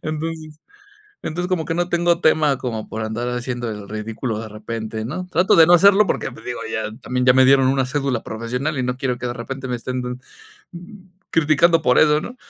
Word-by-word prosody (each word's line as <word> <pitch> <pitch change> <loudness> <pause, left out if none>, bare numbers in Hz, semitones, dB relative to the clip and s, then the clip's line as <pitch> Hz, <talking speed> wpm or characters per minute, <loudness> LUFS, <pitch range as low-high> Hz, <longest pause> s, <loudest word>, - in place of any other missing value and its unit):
entonces 155 0 -5 0.6
entonces, 175 +3 -4
como 175 -4 -1
que 165 - -3
no 175 +1 -1
tengo 175 0 +1
tema 150 -4 +3
como 115 -4 -5
por 110 0 -5
andar 120 +3 -3
haciendo 120 -1 -3
el 105 -2 -7
ridículo 110 +2 -4
de 110 - -6
repente, 110 +1 -6
¿no?, 180 +9 -5
trato 180 +1 +2
de 165 -1 +8
no 175 - +5
hacerlo 200 +3 +6
porque, 135 - -2
pues - - -14
digo, 125 - -5
ya 110 -1 -3
también 125 0 -1
ya 125 - +7
me 130 0 +5
dieron 135 0 +5
una 135 -1 +1
cédula 135 -3 -2
profesional 125 +6 -3
y 125 - 0
no 125 0 -2
quiero 125 -2 -2
que 125 - -4
de 120 - -2
repente 130 +3 -6
me 125 - -2
estén 125 +2 -4
dan 125 0 -5 1.1
criticando 165 +1 +3
por 125 - +3
eso, 150 0 +4
¿no? 245 +9 -8
130 Hz, 210 wpm, -21 LUFS, 120-155 Hz, 1.1 s, de